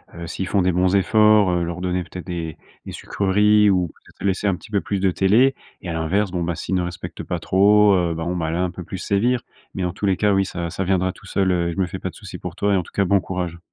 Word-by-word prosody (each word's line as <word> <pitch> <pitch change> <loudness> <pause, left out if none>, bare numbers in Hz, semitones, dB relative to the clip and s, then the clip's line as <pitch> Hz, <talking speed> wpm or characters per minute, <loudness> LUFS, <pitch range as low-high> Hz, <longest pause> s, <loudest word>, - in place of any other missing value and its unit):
heu, 85 0 -7
s'ils 90 +3 -4
font 100 -1 +1
des 90 - +2
bons 90 +2 +2
efforts, 105 0 +4
heu, 90 -1 0
leur 85 +1 -4
donner 90 0 -1
peut-être 90 +1 -9
des 85 -4 -5 0.3
des - - -5
sucreries 105 +2 +3
ou 90 -3 +1
peut-être - - -13
laisser 100 +1 0
un 95 - +2
petit 100 +4 -14
peu 100 -2 +1
plus 100 - -2
de 95 0 +2
télé 110 +9 +4 0.3
et 90 - -5
à - - -2
l'inverse, 90 +5 0
bon, 90 -1 -2
bah, 85 0 -1
s'ils 85 - -4
ne 90 - +2
respectent 90 -1 -6
pas - - -3
trop, 105 +2 +4
heu, 85 -3 +1
bon, 85 +2 -3
bah, 80 -3 -2
là, 85 +3 -1
un 90 - -1
peu 90 +1 -8
plus 95 - -7
sévir. 115 +6 +1 0.3
Mais, 95 - -2
en 90 - -2
tous 100 - -2
les 95 -2 +2
cas, 105 0 +2
oui, 95 0 +2
ça 85 -3 -4
ça 95 - -2
viendra 95 0 +1
tout - - -16
seul, 95 -1 +1
heu 85 -1 0
et - - -3
je - - -11
me 95 - +2
fais 90 - -7
pas - - -4
de - - -14
souci - - -9
pour - - -7
toi 100 0 +1
et - - +3
en - - +1
tout - - -16
cas, 100 - +1
bon 100 +2 +3
courage. 90 -2 -4
95 Hz, 295 wpm, -22 LUFS, 90-100 Hz, 0.3 s, efforts